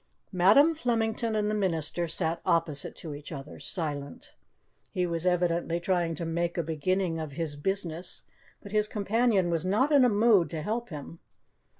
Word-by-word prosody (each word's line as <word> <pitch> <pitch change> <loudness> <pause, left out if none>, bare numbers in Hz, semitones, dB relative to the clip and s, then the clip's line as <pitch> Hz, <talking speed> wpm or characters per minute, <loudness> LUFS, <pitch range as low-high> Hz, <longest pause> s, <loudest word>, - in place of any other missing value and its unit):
Madam 210 - +5
Flemington 230 -5 -1
and 210 -1 +1
the 215 - 0
minister 175 -4 -1
sat 165 0 -1
opposite 160 -4 0
to 155 -3 -7
each 145 +2 -9
other, 140 -2 -8
silent. 145 -5 -5 0.6
He 180 - -1
was 170 0 -1
evidently 175 -1 +1
trying 170 -2 0
to 170 - -4
make 170 +1 -1
a 170 - +1
beginning 165 +2 -1
of 155 -3 -5
his 155 -1 -3
business, 175 +1 -3 0.4
but 200 - -10
his 210 0 +2
companion 210 -3 +1
was 165 -1 0
not 215 +11 +2
in 285 -3 +6
a 250 - +5
mood 210 -4 +4
to 160 -2 -4
help 230 +5 -2
him. 155 +1 -8
175 Hz, 170 wpm, -28 LUFS, 165-210 Hz, 0.6 s, in